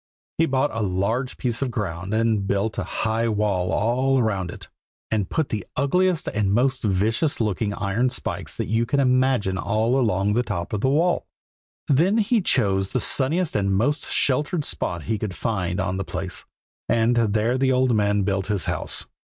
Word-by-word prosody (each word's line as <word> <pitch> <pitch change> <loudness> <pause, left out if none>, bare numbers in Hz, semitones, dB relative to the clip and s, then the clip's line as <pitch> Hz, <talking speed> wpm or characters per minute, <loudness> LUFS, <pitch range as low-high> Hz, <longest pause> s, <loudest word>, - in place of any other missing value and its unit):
He 165 - +4
bought 135 +1 +1
a 115 - -2
large 105 +7 -1
piece 120 -1 0
of 135 - 0
ground 95 -6 -4
and 110 -3 +1
built 100 +2 -1
a - - -1
high 110 +1 -1
wall 100 -4 0
all 130 +5 +1
round 100 -5 -1
it, - - -8 0.4
and 105 -4 0
put 160 -3 -1
the 105 -3 -3
ugliest 180 +5 +1
and 105 -2 0
most 130 +4 +1
vicious 110 - +1
looking 105 -1 0
iron 105 +5 0
spikes - - -4
that - - -1
you 115 +2 0
can 140 +4 +1
imagine 130 -7 +2
all 110 +5 +1
along 105 -4 +1
the 120 - +2
top 95 -7 -4
of 105 - -1
the 130 - +2
wall. 165 +5 +1 0.6
Then 170 - +3
he 225 +1 +2
chose 95 - +1
the 130 - -1
sunniest 150 - +1
and 100 -1 +1
most 140 +9 0
sheltered 145 +3 +1
spot 85 -2 -3
he 110 -2 -2
could 100 -4 -4
find 90 -5 -2
on 95 0 -1
the 95 - -2
place, - - -5 0.4
and 115 +1 +3
there 115 +1 +1
the 135 0 +2
old 130 -2 +2
man 105 -1 +2
built 95 -1 -1
his 100 -5 -1
house. - - -2
110 Hz, 185 wpm, -23 LUFS, 100-130 Hz, 0.6 s, He